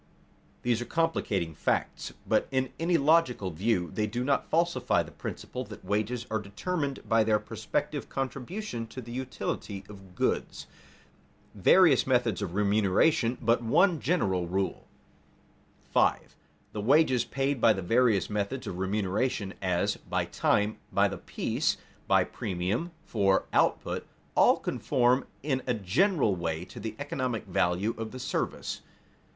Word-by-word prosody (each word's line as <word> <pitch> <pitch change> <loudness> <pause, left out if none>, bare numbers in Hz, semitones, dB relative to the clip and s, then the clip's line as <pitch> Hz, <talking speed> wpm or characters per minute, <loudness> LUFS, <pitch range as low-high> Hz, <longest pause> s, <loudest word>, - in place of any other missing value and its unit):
These 120 -1 +1
are - - -3
complicating 105 - 0
facts, - - -1 0.2
but - - +2
in 130 -1 -1
any 170 +1 +2
logical 140 - +3
view 90 +1 0
they 105 -1 0
do 120 +4 -2
not 140 +1 0
falsify 170 +2 +2
the - - -12
principle - - -6
that - - -11
wages 110 +4 -1
are 110 - +1
determined 140 - -3
by 115 0 +4
their 110 -1 +3
prospective - - -3
contribution 135 - -4
to 130 - -9
the 120 -1 -8
utility 120 -5 -4
of 95 -3 -13
goods. - - 0 0.9
[Sidenote: 100 - -14
Various 165 - +6
methods 120 -7 +2
of 85 - -4
remuneration, 105 +5 +2
but 115 +1 +2
one 165 - +3
general 95 - 0
rule] 95 +2 -2 1.0
5. - - +2 0.4
_The 105 - -4
wages 130 -1 +4
paid 135 -1 -1
by 115 - +7
the 95 -3 -1
various 115 -2 +3
methods 105 +5 -3
of 90 - -5
remuneration 100 +2 -1
as, 90 -2 0
by - - -2
time, 105 +1 +1
by - - +3
the - - -6
piece, - - -1 0.3
by - - +5
premium 95 - -2 0.2
for 95 -3 +2
output - - +1 0.3
all - - +5
conform 125 +2 +1 0.2
in 135 -3 0
a 125 - +1
general 120 - +2
way 85 -1 -3
to - - -11
the 110 +1 -5
economic 130 -5 -3
value 90 +3 +1
of 115 -1 -3
the 130 - -8
service. 130 - -3
115 Hz, 145 wpm, -29 LUFS, 100-130 Hz, 1.0 s, by